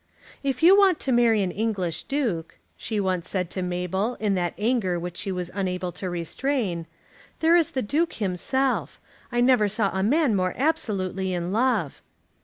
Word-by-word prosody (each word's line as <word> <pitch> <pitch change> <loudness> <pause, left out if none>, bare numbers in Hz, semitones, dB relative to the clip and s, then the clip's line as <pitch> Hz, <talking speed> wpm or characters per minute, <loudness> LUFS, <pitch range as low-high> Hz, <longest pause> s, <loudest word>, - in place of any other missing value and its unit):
"If 270 0 -2
you 365 +4 +8
want 390 -4 +4
to 265 - -1
marry 230 -4 +4
an 185 - -1
English 195 -6 -2
Duke," 225 - -2 0.2
she 215 -2 -3
once 185 -3 -1
said 180 -3 -2
to - - -4
Isabel 180 +5 -2
in 210 -2 +1
that 175 -2 -1
anger 210 -5 0
which 175 0 -6
she 195 - -3
was 180 -1 -4
unable 180 -2 -2
to 185 +1 -5
restrain, 175 - -2 0.5
"there 325 +1 +4
is 335 -3 +3
the 260 - -2
Duke 315 +10 0
himself. 230 +7 -1 0.3
I 240 0 +1
never 245 -4 +4
saw 205 0 0
a 190 - 0
man 260 +3 +2
more 185 -1 0
absolutely 195 - -1
in 175 +1 -3
love." 225 - 0
205 Hz, 175 wpm, -25 LUFS, 180-255 Hz, 0.5 s, you